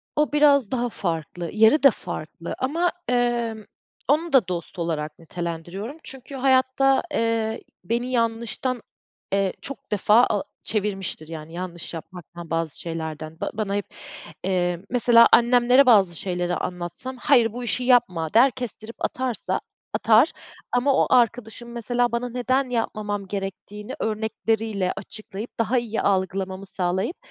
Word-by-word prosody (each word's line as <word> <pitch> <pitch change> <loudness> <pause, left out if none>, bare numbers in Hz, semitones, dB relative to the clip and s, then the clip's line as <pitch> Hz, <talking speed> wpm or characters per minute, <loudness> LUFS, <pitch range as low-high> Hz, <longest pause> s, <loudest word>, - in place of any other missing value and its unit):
O, 300 0 +2
biraz 285 -6 +4
daha 245 -1 0
farklı. 170 -3 -4
Yeri 220 +8 +5
de 275 - +9
farklı 165 -3 -6
ama, 330 +7 0 0.2
emm, 240 -3 0 0.4
onu 315 +4 +1
da 255 -8 +5
dost 180 +1 -5
olarak 155 -3 -3
nitelendiriyorum. 175 - -5
Çünkü 265 +1 -7
hayatta, 265 0 +3
eee, 225 -1 0 0.2
beni 235 +6 -1
yanlıştan, 235 +1 -1 0.5
eee, 195 -1 +1
çok 275 0 -5
defa 210 +3 +5
a 205 - 0 0.2
çevirmiştir. 195 -6 -2
Yani, 160 0 -8
yanlış 175 -1 -5
yapmaktan, 170 0 -9
bazı 165 -2 -1
şeylerden. 160 -1 -5
Ba - - -2
bana 205 -2 -2
hep, 205 -2 -1 0.6
eee, 180 -2 0
mesela 235 -1 +6
annemlere 245 +3 +6
bazı 200 -8 +5
şeyleri 180 0 -2
anlatsam, 180 +9 -5
"Hayır, 240 -4 +3
bu 245 +1 -5
işi 245 +1 0
yapma." 185 -11 +2
der 250 +5 +6
kestirip 230 -2 -6
atarsa 255 -3 -2 0.3
atar 225 +7 +4 0.4
ama 250 +3 +3
o - - +3
arkadaşım 235 -1 +1
mesela 240 +1 0
bana 235 +1 -2
neden 255 +2 0
yapmamam 210 -4 -2
gerektiğini 200 +1 -6
örnekleriyle 220 -2 -1
açıklayıp, 210 +3 -8
daha 230 +3 +2
iyi 230 -2 -1
algılamamı 190 0 -1
sağlayıp 190 - -2
220 Hz, 130 wpm, -24 LUFS, 185-245 Hz, 0.6 s, de